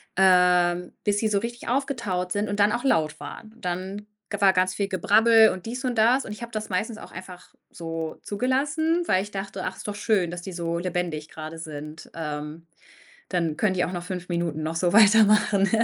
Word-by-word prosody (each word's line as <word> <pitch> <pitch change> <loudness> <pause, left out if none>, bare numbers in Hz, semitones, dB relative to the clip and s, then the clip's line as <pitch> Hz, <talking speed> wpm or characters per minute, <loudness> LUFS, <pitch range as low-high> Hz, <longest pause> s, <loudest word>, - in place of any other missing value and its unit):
ähm, 180 -1 +4
bis 205 0 +1
sie 220 - +1
so 205 -2 +1
richtig 235 +2 -6
aufgetaut 235 -9 -1
sind 205 +2 0
und 205 0 -3
dann 205 +1 +4
auch 240 +3 -2
laut 155 - +1
waren 220 - -9
und 230 - -15
dann 190 +4 -4 0.2
ge 205 - -4
war 195 -1 +5
ganz 185 0 +2
viel 200 -1 -1
Gebrabbel 220 +4 +5
und 185 - -6
dies 245 +4 -5
und 250 -2 -1
das 240 +5 +4
und - - -8
ich 210 - -8
habe 235 0 -7
das 215 -1 -4
meistens 215 +4 -2
auch - - -11
einfach 180 0 -11 0.2
so 165 -1 -5
zugelassen, 285 +9 0
weil 185 - +3
ich 205 +1 -8
dachte: 195 -1 -5
„Ach, 185 - -3
ist - - -9
doch 205 - -4
schön, 205 -5 +1
dass 175 0 -6
die 185 0 -7
so 170 -1 -2
lebendig 175 -4 -3
grade 155 +1 -8
sind“, 155 0 -8
ähm, 150 +1 -5 0.6
dann 165 -4 -1
können 205 -3 +1
die 180 - +1
auch - - -5
noch 175 -2 -4
5 180 0 -6
Minuten 170 -3 -2
noch 160 +1 -3
so 175 +1 +1
weitermachen, 210 -1 +5
190 Hz, 210 wpm, -25 LUFS, 175-215 Hz, 0.6 s, war